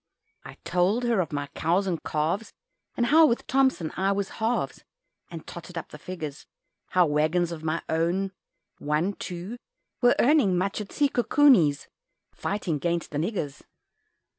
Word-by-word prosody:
I -, -, -11 dB
told 185 Hz, +7 st, +1 dB
her 235 Hz, -4 st, +2 dB
of 165 Hz, -, -4 dB
my 145 Hz, -1 st, -2 dB
cows 175 Hz, +5 st, +1 dB
and 170 Hz, -5 st, -2 dB
calves, 160 Hz, +8 st, -1 dB, 0.5 s
And 240 Hz, -, +2 dB
how 315 Hz, +5 st, +6 dB
with 235 Hz, -, 0 dB
Thomson 260 Hz, -, +1 dB
I 190 Hz, +2 st, +1 dB
was 200 Hz, -1 st, -1 dB
"halves," 225 Hz, +2 st, -1 dB, 0.5 s
And 165 Hz, -2 st, -8 dB
totted 175 Hz, 0 st, -9 dB
up 165 Hz, -, -5 dB
the 150 Hz, -, -11 dB
figures 155 Hz, -4 st, -7 dB, 0.4 s
How 180 Hz, -1 st, +3 dB
waggons 155 Hz, +3 st, +1 dB
of 160 Hz, -2 st, -7 dB
my 160 Hz, +1 st, -1 dB
own, 175 Hz, +4 st, 0 dB, 0.5 s
one, 150 Hz, +7 st, 0 dB
two, 185 Hz, +5 st, -6 dB, 0.4 s
Were 245 Hz, -1 st, +5 dB
earning 250 Hz, -, +4 dB
much 195 Hz, +3 st, -1 dB
at 205 Hz, -, -8 dB
Se 290 Hz, -1 st, +2 dB
coo 245 Hz, -, +1 dB
coo 290 Hz, +3 st, +5 dB
Ni's, 150 Hz, -, +3 dB, 0.5 s
fighting 185 Hz, -7 st, -2 dB
'gainst 170 Hz, +3 st, -2 dB
the 145 Hz, -, -2 dB
niggers. 160 Hz, -5 st, -3 dB
180 Hz, 165 wpm, -26 LUFS, 160-220 Hz, 0.5 s, how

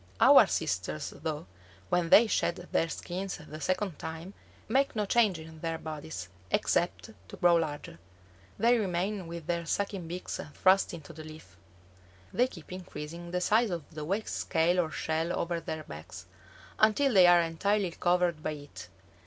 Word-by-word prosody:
Our -, -, +8 dB
sisters, 90 Hz, -4 st, -2 dB
though, 155 Hz, -2 st, -5 dB, 0.4 s
when 175 Hz, -2 st, +1 dB
they 230 Hz, -, +8 dB
shed 195 Hz, -5 st, +1 dB, 0.2 s
their 165 Hz, -, +1 dB
skins 185 Hz, +3 st, -4 dB
the 155 Hz, +1 st, -10 dB
second 185 Hz, +1 st, -1 dB
time, 165 Hz, +4 st, -7 dB, 0.3 s
make 270 Hz, +4 st, +1 dB
no 210 Hz, -1 st, 0 dB
change 210 Hz, -3 st, +3 dB
in 160 Hz, 0 st, -11 dB
their 165 Hz, 0 st, -2 dB
bodies, 155 Hz, -, -6 dB, 0.2 s
except -, -, 0 dB, 0.2 s
to -, -, -10 dB
grow 175 Hz, -1 st, +5 dB
larger. 145 Hz, -, -4 dB, 0.6 s
They 235 Hz, +1 st, +4 dB
remain 190 Hz, -1 st, -2 dB
with 170 Hz, -1 st, -7 dB
their 170 Hz, 0 st, -1 dB
sucking 195 Hz, -1 st, -2 dB
beaks 175 Hz, +2 st, -5 dB, 0.2 s
thrust 190 Hz, -1 st, +3 dB
into 160 Hz, -3 st, -11 dB
the 155 Hz, -, -9 dB
leaf. 155 Hz, -, -12 dB, 0.8 s
They 250 Hz, +2 st, +3 dB
keep 170 Hz, -10 st, -13 dB
increasing 175 Hz, -2 st, -7 dB
the 180 Hz, +1 st, -1 dB
size 220 Hz, +4 st, +3 dB
of 170 Hz, -6 st, -4 dB
the 155 Hz, -1 st, -5 dB
wax 195 Hz, +8 st, -2 dB
scale 175 Hz, +1 st, +1 dB
or 165 Hz, -3 st, +1 dB
shell 160 Hz, +2 st, -2 dB
over 170 Hz, 0 st, -1 dB
their 160 Hz, -1 st, -5 dB
backs, 85 Hz, -, -10 dB, 0.5 s
until 235 Hz, +5 st, +4 dB
they 185 Hz, -3 st, +8 dB
are 175 Hz, -1 st, +7 dB
entirely 185 Hz, +4 st, 0 dB
covered 175 Hz, -2 st, +1 dB
by 155 Hz, -, -2 dB
it. 145 Hz, -12 st, -10 dB
170 Hz, 160 wpm, -30 LUFS, 155-190 Hz, 0.8 s, Our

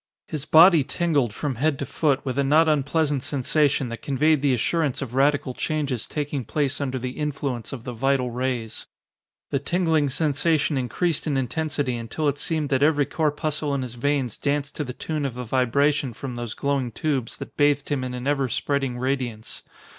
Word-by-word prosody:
His 155 Hz, -3 st, -5 dB
body 165 Hz, -1 st, +7 dB
tingled 145 Hz, -, +1 dB
from 140 Hz, +6 st, -3 dB
head 145 Hz, +2 st, +1 dB
to 140 Hz, -, -3 dB
foot 140 Hz, 0 st, 0 dB
with 130 Hz, 0 st, -2 dB
a -, -, +3 dB
not 155 Hz, +4 st, +4 dB
unpleasant 150 Hz, -1 st, +1 dB
sensation 140 Hz, 0 st, +1 dB
that 115 Hz, -, -7 dB
conveyed 150 Hz, +2 st, +2 dB
the 140 Hz, -1 st, +3 dB
assurance 150 Hz, +3 st, 0 dB
of 120 Hz, -3 st, -8 dB
radical 140 Hz, 0 st, +2 dB
changes 140 Hz, -5 st, -2 dB
taking 145 Hz, -3 st, -3 dB
place 145 Hz, +4 st, -1 dB
under 130 Hz, -2 st, -2 dB
the 125 Hz, 0 st, -4 dB
influence 140 Hz, -4 st, -3 dB
of 125 Hz, -4 st, -7 dB
the 125 Hz, -, -5 dB
vital 130 Hz, +1 st, +1 dB
rays. 120 Hz, -2 st, -3 dB, 0.6 s
The 140 Hz, -, +1 dB
tingling 160 Hz, -1 st, +1 dB
sensation 150 Hz, +2 st, +1 dB
increased 145 Hz, +6 st, 0 dB
in 145 Hz, -3 st, +1 dB
intensity 135 Hz, -1 st, -1 dB
until 115 Hz, +7 st, -2 dB
it 145 Hz, 0 st, 0 dB
seemed 155 Hz, -3 st, -1 dB
that 135 Hz, -1 st, +1 dB
every 145 Hz, -1 st, +4 dB
corpuscle 150 Hz, -1 st, -1 dB
in 135 Hz, -, -1 dB
his 125 Hz, -2 st, -6 dB
veins 130 Hz, -1 st, -1 dB
danced 145 Hz, 0 st, -1 dB
to 150 Hz, -, -1 dB
the 125 Hz, -3 st, -6 dB
tune 155 Hz, +3 st, -3 dB
of 135 Hz, -4 st, -2 dB
the 125 Hz, -, -4 dB
vibration 130 Hz, +3 st, +1 dB
from 130 Hz, +3 st, -6 dB
those 120 Hz, -2 st, -5 dB
glowing 140 Hz, -3 st, -1 dB
tubes 135 Hz, -3 st, -2 dB
that -, -, -9 dB
bathed 145 Hz, -1 st, +2 dB
him 140 Hz, -3 st, -1 dB
in 125 Hz, -1 st, -4 dB
an 125 Hz, +1 st, -6 dB
ever 140 Hz, -2 st, +1 dB
spreading 135 Hz, 0 st, -1 dB
radiance. 125 Hz, -4 st, -3 dB
140 Hz, 185 wpm, -24 LUFS, 125-150 Hz, 0.6 s, body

